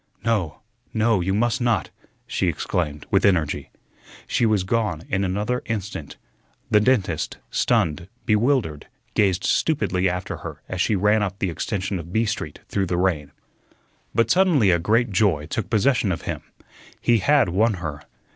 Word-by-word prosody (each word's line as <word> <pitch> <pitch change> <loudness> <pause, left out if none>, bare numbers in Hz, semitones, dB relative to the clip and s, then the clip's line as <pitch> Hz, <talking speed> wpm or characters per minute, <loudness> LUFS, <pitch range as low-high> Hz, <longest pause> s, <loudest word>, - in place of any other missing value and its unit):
"No, 95 -10 0 0.3
no, 110 -3 +3
you 95 +2 0
must 115 +4 +1
not!" 120 -2 +1 0.3
she - - -1
exclaimed, 75 -4 -2
with - - +3
energy. 85 -7 +1 0.6
She 115 - +1
was 105 -4 +2
gone 100 -5 -1
in 95 +1 0
another 105 +6 -1
instant. 100 -9 -4 0.5
The 105 - +6
dentist, 105 - +1
stunned, 80 +2 +1 0.2
bewildered, 105 - +1 0.3
gazed 95 -2 +2
stupidly 95 - +1
after 90 +1 -4
her - - -9
as 95 -1 -2
she 110 - +2
ran 105 +3 +3
up 100 -2 -2
the 95 -3 -1
extension 95 +2 -3
of 85 +1 -9
B 110 +4 +2
Street 105 -9 -4
through 100 -2 -1
the 90 - -1
rain. 85 -6 0 0.8
But 115 -1 +3
suddenly 165 - +4
a 85 - +3
great 110 +6 +2
joy 95 -7 +2
took 100 +7 -3
possession 115 -1 +2
of 85 - -3
him. - - -4 0.6
He 120 -2 +3
had 145 -1 +3
won 105 +5 +2
her. 80 -5 -5
100 Hz, 155 wpm, -23 LUFS, 90-115 Hz, 0.8 s, The